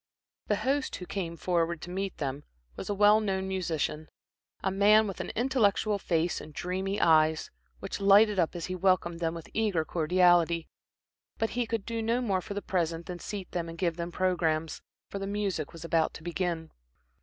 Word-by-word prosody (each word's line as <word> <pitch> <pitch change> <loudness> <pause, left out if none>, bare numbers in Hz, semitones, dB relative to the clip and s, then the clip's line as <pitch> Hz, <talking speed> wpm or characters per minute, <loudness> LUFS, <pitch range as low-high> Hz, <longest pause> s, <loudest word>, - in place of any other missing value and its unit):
The - - +2
host, 275 +1 -1
who 180 - -7
came 170 -3 -4
forward 170 -1 0
to 175 - -7
meet 195 +1 -3
them, 140 0 -3 0.3
was - - -7
a 205 - 0
well 210 +2 +6
known 190 -3 -1
musician, 160 -4 -2 0.5
a 190 - +1
man 210 +3 +5
with 195 -3 -5
an 180 - -5
intellectual 215 -4 +2
face 170 -2 0
and 150 - -12
dreamy 190 +3 -2
eyes, 160 -1 +3 0.3
which 195 - -5
lighted 200 +1 +6
up 170 0 +1
as 170 - -4
he 185 - -4
welcomed 180 -2 +1
them 165 -1 -1
with 165 - -9
eager 205 -8 +1
cordiality; 170 0 +3 0.7
but 225 - -1
he 245 -1 -1
could 225 -3 -2
do 230 -1 -3
no 230 +2 +1
more 200 -7 0
for 200 - -7
the 205 - -3
present 170 -2 -1
than 180 -1 -6
seat 195 -1 -6
them 170 -2 -3
and 165 - -8
give 170 -2 0
them 170 0 -4
programmes, 165 -3 0 0.3
for 200 - -4
the 195 - -4
music 200 -7 -2
was 165 0 -9
about 165 -1 +1
to 165 - -10
begin. 170 -1 -2
180 Hz, 190 wpm, -29 LUFS, 165-200 Hz, 0.7 s, well